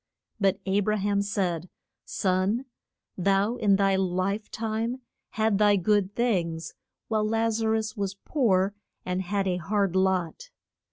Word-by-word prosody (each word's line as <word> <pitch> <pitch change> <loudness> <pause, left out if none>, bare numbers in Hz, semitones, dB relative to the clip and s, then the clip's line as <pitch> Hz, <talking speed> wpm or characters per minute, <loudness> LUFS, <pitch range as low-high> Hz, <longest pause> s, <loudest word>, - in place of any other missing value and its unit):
] - - -54
But 195 0 +2
A 195 +1 +2
bra 215 +1 +1
ham 200 0 +1
said, 185 -4 -2 0.4
Son, 190 +6 0 0.5
thou 195 +5 +2
in 200 -2 +3
thy 195 0 +3
life 190 +3 -1
time 230 +3 -3 0.3
had 220 -2 +1
thy 205 -1 +5
good 205 +1 +1
things, 175 -9 -1 0.3
while 215 -1 +1
Laz 225 +1 0
a 220 - +1
rus 220 0 -1
was 200 -1 -3
poor 200 -5 +1 0.3
and 180 +1 -1
had 195 +1 -1
a 180 -1 0
hard 195 +1 0
lot. 190 - 0
200 Hz, 150 wpm, -27 LUFS, 190-220 Hz, 0.5 s, thy